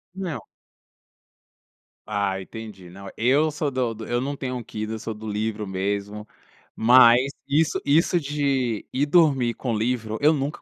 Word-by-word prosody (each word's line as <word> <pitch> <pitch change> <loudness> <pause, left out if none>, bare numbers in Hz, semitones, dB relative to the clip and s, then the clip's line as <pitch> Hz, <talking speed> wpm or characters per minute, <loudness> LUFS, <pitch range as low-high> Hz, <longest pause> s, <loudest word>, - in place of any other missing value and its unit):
Não. 175 - -4 1.6
Ah, 100 -2 -1
entendi, 100 -3 -10
não. 95 +2 -10
Eu 140 +7 +3
sou 150 0 -2
do 125 -3 -1
do 110 0 -8
eu 120 0 0
não 140 +2 -3
tenho 130 -2 -4
um 120 - -5
Kindle, 110 +1 -5
eu - - -7
sou 110 +1 -5
do 110 +1 -9
livro 105 0 -3
mesmo. 100 +2 -3 0.5
Mas, 125 +3 +6 0.2
isso 155 +3 +1
isso 165 +4 +3
de 140 -6 -1
ir 140 +3 +1
dormir 145 -7 +3
com 120 -4 -3
livro, 110 -1 -2
eu 150 +2 +6
nunca 145 0 -3
120 Hz, 160 wpm, -24 LUFS, 105-140 Hz, 1.6 s, Mas